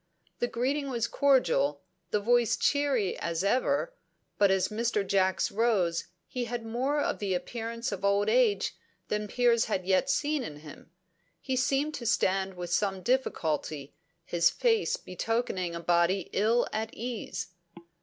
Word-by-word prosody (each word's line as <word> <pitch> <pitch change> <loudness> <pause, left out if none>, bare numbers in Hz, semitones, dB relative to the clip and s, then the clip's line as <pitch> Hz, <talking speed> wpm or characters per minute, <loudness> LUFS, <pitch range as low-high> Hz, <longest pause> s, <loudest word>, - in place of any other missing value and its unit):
The 240 - +1
greeting 275 +4 -1
was 235 -3 0
cordial, 165 - +2 0.3
the 210 - +1
voice 235 +1 +2
cheery 280 -9 +1
as 170 +1 -2
ever, 280 - +1 0.5
but 200 -1 +5
as 190 -1 +2
Mr. 220 -2 0
Jacks 190 -1 +1
rose 195 -6 +1 0.2
he 250 -1 -4
had 235 0 -4
more 260 +6 0
of - - -1
the 195 -3 -1
appearance 230 +4 -4
of 200 -1 -5
old 200 +1 +2
age 475 -4 +2 0.3
than 210 0 -1
Piers 235 +1 +3
had 190 -4 -2
yet 190 +8 +2
seen 295 +1 +1
in 150 -11 -7
him; 150 +1 -12 0.5
he 260 - -2
seemed 275 +4 +1
to 240 -5 -5
stand 195 -4 +1
with 175 -1 -4
some 195 -3 0
difficulty, 155 - -1 0.3
his 170 -1 +3
face 460 - +1
betokening 185 - -2
a - - -4
body 175 +2 +1
ill 225 +4 +2
at 220 +1 -2
ease. 240 -4 -5
220 Hz, 150 wpm, -29 LUFS, 185-250 Hz, 0.5 s, but